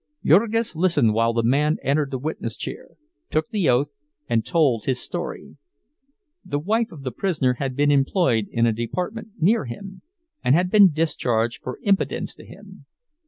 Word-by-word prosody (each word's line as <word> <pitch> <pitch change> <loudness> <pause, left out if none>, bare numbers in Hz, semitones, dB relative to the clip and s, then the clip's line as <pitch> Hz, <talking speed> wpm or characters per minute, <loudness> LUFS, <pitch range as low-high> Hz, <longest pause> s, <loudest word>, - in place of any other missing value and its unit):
Jurgis 220 +6 +3
listened 155 -10 +3
while 115 +1 +2
the 115 0 0
man 145 +6 +2
entered 140 +1 +1
the 135 - -3
witness 125 -5 -4
chair, - - -8 0.3
took 155 0 -1
the 200 -7 +1
oath, 140 +4 +2 0.4
and 115 -2 +1
told 130 -4 +1
his 130 -2 0
story. - - -6 0.9
The 145 - -3
wife 220 +9 0
of 150 -5 -11
the 130 - -3
prisoner 130 - 0
had 135 -2 -2
been 145 +1 +3
employed 135 - +2
in 115 0 +1
a 115 - +2
department 180 - -4
near 195 0 +2
him, 190 +11 -9 0.4
and 130 - +4
had 180 +2 +1
been 205 -4 +7
discharged 120 -7 -1
for 125 - -6
impudence 200 -1 0
to - - -15
him. - - -14
145 Hz, 165 wpm, -23 LUFS, 125-180 Hz, 0.9 s, been